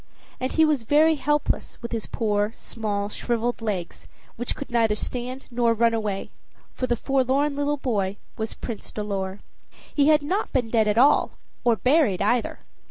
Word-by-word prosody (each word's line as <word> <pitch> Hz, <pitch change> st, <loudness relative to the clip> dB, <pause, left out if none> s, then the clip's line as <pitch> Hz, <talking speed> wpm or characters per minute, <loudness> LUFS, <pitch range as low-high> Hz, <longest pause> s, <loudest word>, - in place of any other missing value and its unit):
And 255 Hz, +1 st, -2 dB
he 320 Hz, -, +5 dB
was 300 Hz, -5 st, +2 dB
very 300 Hz, +7 st, +4 dB
helpless, 295 Hz, 0 st, -1 dB
with 235 Hz, -, -5 dB
his 225 Hz, -2 st, -3 dB
poor, 210 Hz, -1 st, 0 dB
small 205 Hz, -3 st, -3 dB
shriveled 240 Hz, +2 st, -2 dB
legs, 195 Hz, -6 st, -4 dB, 0.3 s
which 240 Hz, +1 st, -4 dB
could 280 Hz, -, -7 dB
neither 225 Hz, -3 st, +3 dB
stand 250 Hz, +4 st, -5 dB
nor 235 Hz, -1 st, +2 dB
run 230 Hz, +1 st, +3 dB
away 210 Hz, -3 st, -2 dB, 0.4 s
for 255 Hz, -, -2 dB
the 240 Hz, -, +2 dB
little 270 Hz, +2 st, +1 dB
forlorn 285 Hz, +2 st, +1 dB
boy 205 Hz, -7 st, -1 dB, 0.2 s
was 220 Hz, 0 st, -4 dB
Prince 230 Hz, -4 st, -6 dB
Dolor. 200 Hz, -2 st, -3 dB, 0.5 s
He 285 Hz, -1 st, +3 dB
had 305 Hz, -1 st, +5 dB
not 375 Hz, +8 st, -1 dB
been 245 Hz, -4 st, 0 dB
dead 220 Hz, -2 st, +3 dB
at 210 Hz, +1 st, +1 dB
all 270 Hz, +4 st, +5 dB, 0.3 s
or 235 Hz, -2 st, +4 dB
buried 255 Hz, -, +3 dB
either. 225 Hz, +4 st, 0 dB
235 Hz, 165 wpm, -25 LUFS, 215-275 Hz, 0.5 s, he